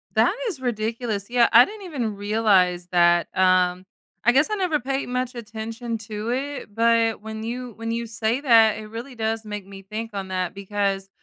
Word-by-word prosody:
That - - +4
is 365 -11 -3
ridiculous. 225 -3 -2
Yeah, 240 -1 +4
I 240 +2 +9
didn't 415 -2 -10
even 245 - -3
realize 200 -4 +2
that. 175 -1 +4
Um, 185 0 +3 0.4
I 240 - +5
guess 270 - +3
I 425 - 0
never 360 -7 0
paid 270 +1 -2
much 250 +1 -2
attention 230 +1 -5
to 220 +1 -5
it, 275 -3 -4
but 230 -1 +2
when 220 0 -6
you 245 +1 -5
when 230 0 -4
you 235 0 -2
say 225 +3 -1
that, 225 -6 +5
it 215 0 -8
really 235 +4 -8
does 220 0 -2
make 210 -2 -6
me 195 -1 -10
think 220 +3 -6
on 195 -1 -4
that 185 -1 -2
because 200 -1 -2
225 Hz, 185 wpm, -23 LUFS, 205-245 Hz, 0.4 s, I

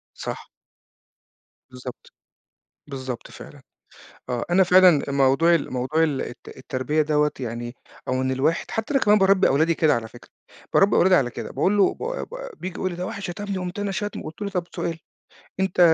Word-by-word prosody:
صح. - - -6 1.2
بالضبط. 125 0 -10 0.8
بالضبط 130 -4 -6
فعلًا، - - -12 0.7
آه 120 -2 -2
أنا 190 +2 +5
فعلًا 180 -4 +6
موضوع 140 +5 +4
ال 165 - -1
موضوع 130 +6 0
ال 150 -4 +1
الت 120 - -9
التربية 130 +4 -1
دوّة 150 0 +2
يعني 120 0 -5 0.3
أو - - 0
إن 130 - 0
الواحد 135 +5 0
حتى 225 +6 -3
أنا 275 - +4
كمان 210 0 +5
بارَبّي 195 0 +4
أولادي 160 +4 +3
كده 155 -2 +3
على 115 -1 -3
فكرة، 120 - -16 0.4
بارَبّي 200 +1 +5
أولادي 185 +1 +5
على 135 -8 +3
كده، - - -7
باقول 190 +9 +1
له 200 - +4
ب - - -24
ب - - -4 0.3
بييجي 185 -1 -5
يقول 185 - -1
لي: 175 - -6
"ده 180 +1 -4
واحد 200 - -6
شتمني، 195 +2 -4
قُمت 180 +1 -5
أنا 205 -1 -1
شاتمه" 205 0 -4
قُلت 155 +6 -8
له: 200 - -2
"طب 180 -3 -2
سؤال 165 -1 -3 0.6
أنت 190 -2 -1
160 Hz, 180 wpm, -24 LUFS, 130-190 Hz, 1.2 s, فعلًا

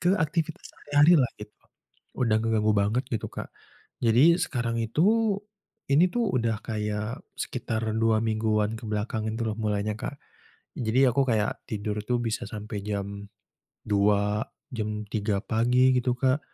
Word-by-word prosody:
ke 175 - +1
aktivitas 160 0 -1
sehari-hari 145 +3 +3
lah 125 -5 +3
gitu. 105 0 -10 0.6
Udah 115 -4 +3
ngeganggu 110 -1 +2
banget 105 +6 +1
gitu, 110 - -2
Kak. - - -6 0.6
Jadi 130 +9 +6
sekarang 120 -7 -1
itu, 115 +7 0 0.9
ini 165 +6 +5
tuh 240 -1 +1 0.2
udah 115 -1 0
kayak 105 0 -3 0.2
sekitar 110 0 -3 0.2
2 115 -1 +3
mingguan 110 -1 +1
ke 115 - -11
belakang 110 +1 -2
itu 115 +2 -3
loh - - -1
mulainya 105 -1 -1
Kak. 140 - -5 0.6
Jadi 120 +2 +1
aku 135 +3 +2
kayak 110 -2 0
tidur 105 0 -3
itu 120 +4 -1
bisa 115 0 -2
sampai 105 -1 -6
jam 100 -1 -4 0.6
2.00, 105 +1 +2 0.3
jam 105 -2 -3
3.00 105 -1 -1
pagi 125 +3 +3
gitu, 125 0 +1
Kak. 130 +2 +2
110 Hz, 145 wpm, -27 LUFS, 105-125 Hz, 0.9 s, Jadi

